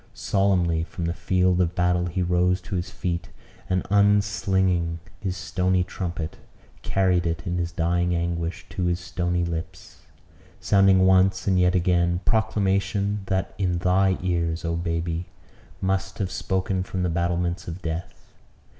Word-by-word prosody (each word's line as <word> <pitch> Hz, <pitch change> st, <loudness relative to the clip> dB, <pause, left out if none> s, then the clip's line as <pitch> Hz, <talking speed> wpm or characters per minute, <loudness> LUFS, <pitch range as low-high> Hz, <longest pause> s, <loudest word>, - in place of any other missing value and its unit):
Solemnly 90 Hz, -5 st, +1 dB
from 85 Hz, +1 st, -5 dB
the 85 Hz, -, -1 dB
field 90 Hz, +1 st, +2 dB
of 85 Hz, -1 st, 0 dB
battle 90 Hz, -1 st, +1 dB
he 90 Hz, +2 st, -1 dB
rose 90 Hz, +1 st, +2 dB
to 95 Hz, +3 st, -8 dB
his 90 Hz, 0 st, -2 dB
feet; 85 Hz, -3 st, -3 dB, 0.4 s
and, 95 Hz, 0 st, 0 dB
unslinging 95 Hz, -4 st, +2 dB, 0.2 s
his 95 Hz, -1 st, -3 dB
stony 90 Hz, -1 st, +1 dB
trumpet, 85 Hz, -3 st, -5 dB, 0.4 s
carried 90 Hz, -3 st, +1 dB
it, 85 Hz, 0 st, -3 dB
in 90 Hz, 0 st, -1 dB
his 85 Hz, -1 st, -2 dB
dying 85 Hz, +1 st, +1 dB
anguish, 85 Hz, 0 st, -2 dB
to 90 Hz, -, -2 dB
his 85 Hz, 0 st, 0 dB
stony 90 Hz, 0 st, -1 dB
lips 85 Hz, -1 st, -6 dB, 0.6 s
sounding 95 Hz, -2 st, +4 dB
once, 95 Hz, 0 st, +4 dB
and 95 Hz, -2 st, +3 dB
yet 90 Hz, 0 st, +3 dB
once 90 Hz, -, +3 dB
again; 85 Hz, -1 st, +2 dB
proclamation 100 Hz, -2 st, +1 dB
that, 95 Hz, -1 st, -1 dB
in 90 Hz, -3 st, +1 dB
thy 95 Hz, +2 st, +2 dB
ears, 85 Hz, -2 st, -1 dB
oh 85 Hz, 0 st, -1 dB
baby! 85 Hz, 0 st, -2 dB, 0.5 s
must 95 Hz, 0 st, -1 dB
have 95 Hz, -2 st, -2 dB
spoken 95 Hz, 0 st, -1 dB
from 95 Hz, 0 st, -3 dB
the -, -, +1 dB
battlements 85 Hz, +1 st, -1 dB
of 85 Hz, +3 st, -7 dB
death. 80 Hz, -7 st, -6 dB
90 Hz, 150 wpm, -25 LUFS, 85-95 Hz, 0.6 s, sounding